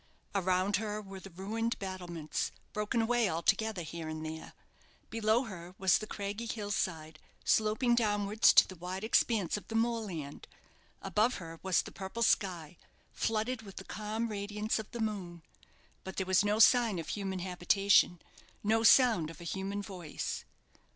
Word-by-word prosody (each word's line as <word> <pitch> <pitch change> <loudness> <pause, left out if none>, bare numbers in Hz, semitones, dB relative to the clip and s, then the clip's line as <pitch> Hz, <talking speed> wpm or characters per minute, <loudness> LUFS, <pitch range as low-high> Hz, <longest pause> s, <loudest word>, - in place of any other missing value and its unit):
Around 190 0 +2
her 210 0 -3
were 195 -2 -9
the 195 - -11
ruined 220 +6 -2
battlements, 180 -5 -4 0.2
broken 210 +2 0
away 235 -2 +2
altogether 180 +4 0
here 160 0 -6
and 155 0 -5
there; 160 0 -7 0.6
below 225 +2 +2
her 180 -5 -9
was 190 -1 +4
the 215 - -6
craggy 205 +3 -4
hill 210 -3 -4
side, 160 -6 -2 0.3
sloping 220 +3 +3
downwards 210 -2 +4
to - - +7
the 185 - -9
wide 180 +3 -5
expanse 220 -4 +2
of 200 - -10
the 225 - -5
moorland; 215 -11 -2 0.6
above 220 +4 +2
her 165 -2 -8
was 190 -2 +2
the - - -9
purple 195 +5 -4
sky, 175 -7 +1 0.4
flooded 225 +2 -1
with 195 -3 -12
the - - -7
calm 220 +2 -3
radiance 210 +1 -2
of 220 - -7
the 235 - -7
moon; 190 -6 -3 0.6
but 190 - -8
there 190 - 0
was 190 +1 +4
no 205 +1 +1
sign 230 -2 +5
of 165 - -5
human 195 -2 -3
habitation, 180 0 +3 0.4
no 220 +2 +3
sound 225 - +5
of 165 - -11
a - - -9
human 195 +4 -3
voice. 185 -6 -5
200 Hz, 160 wpm, -32 LUFS, 180-220 Hz, 0.6 s, to